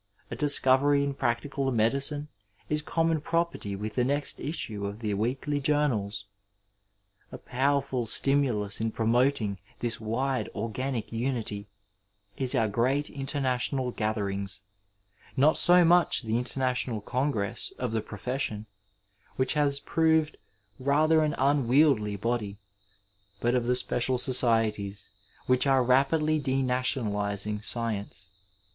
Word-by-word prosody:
A - - -3
discovery 140 0 +3
in 140 0 -1
practical 135 +2 -1
medicine 140 +6 +1 0.4
is 150 0 0
conmion 165 0 0
property 165 -11 -2
with 105 +2 -5
the 125 - +1
next 140 +3 +1
issue 110 -10 -3
of 100 +1 -6
the 110 -2 -3
weekly 130 +7 -1
journals. 130 -9 0 1.1
A - - -7
powerful 135 -1 -1
stimulus 120 -6 +1
in 115 - 0
promoting 115 -2 +1 0.2
this 120 -1 -2
wide 125 +5 -2
organic 115 +3 -3
unity 115 -4 -3 0.7
is 130 -2 -1
our 110 - +2
great 130 +7 0
international 135 -2 -1
gatherings 100 -3 -2 0.4
— 100 +1 -29
^not 150 +4 +4
so 175 0 +5
much 175 -5 +3
the 110 +1 0
International 125 -2 -2
Congress 125 -2 -1
of 125 -2 -3
the 110 -1 -1
profession, 110 0 -4 0.7
which 130 0 +1
has 145 -2 +1
proved 160 0 +1 0.4
rather 155 +4 +3
an 150 -1 -1
unwieldy 135 -5 +3
body, 105 -1 -2 0.8
but 120 +1 +1
of 125 -2 0
the 125 - +2
special 125 0 +2
societies 110 -6 +1 0.4
which 130 +2 +3
are 135 -2 +4
rapidly 150 +5 +2
denationaUzing 115 -6 -1
science. 105 -7 -3
125 Hz, 120 wpm, -28 LUFS, 110-140 Hz, 1.1 s, so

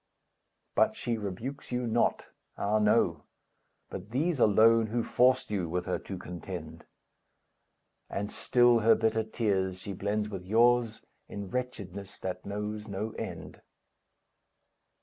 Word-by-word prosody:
But - - +3
she 120 - -2
rebukes 110 +8 -6
you 125 0 -1
not, 115 +1 +1 0.3
Ah, 105 +2 +1
no, 105 0 +3 0.7
but 95 +3 -7
these 150 +5 0
alone, 110 +1 +5
Who 115 +2 -1
forced 130 0 +3
you 95 -5 -1
with 90 +1 -2
her 90 - -1
to 95 - -7
contend; 85 -2 -8 1.2
And 100 +1 -3
still 120 -2 +4
her 115 +1 +5
bitter 110 0 +1
tears 100 -4 -1
she 100 +2 -6
blends 105 +2 -1
with 95 -4 -6
yours, 115 +3 +3 0.2
In 100 -2 -6
wretchedness 100 -7 -5
that 90 0 -5
knows 105 +1 -4
no 105 +2 -3
end. - - -7
105 Hz, 130 wpm, -30 LUFS, 95-115 Hz, 1.2 s, alone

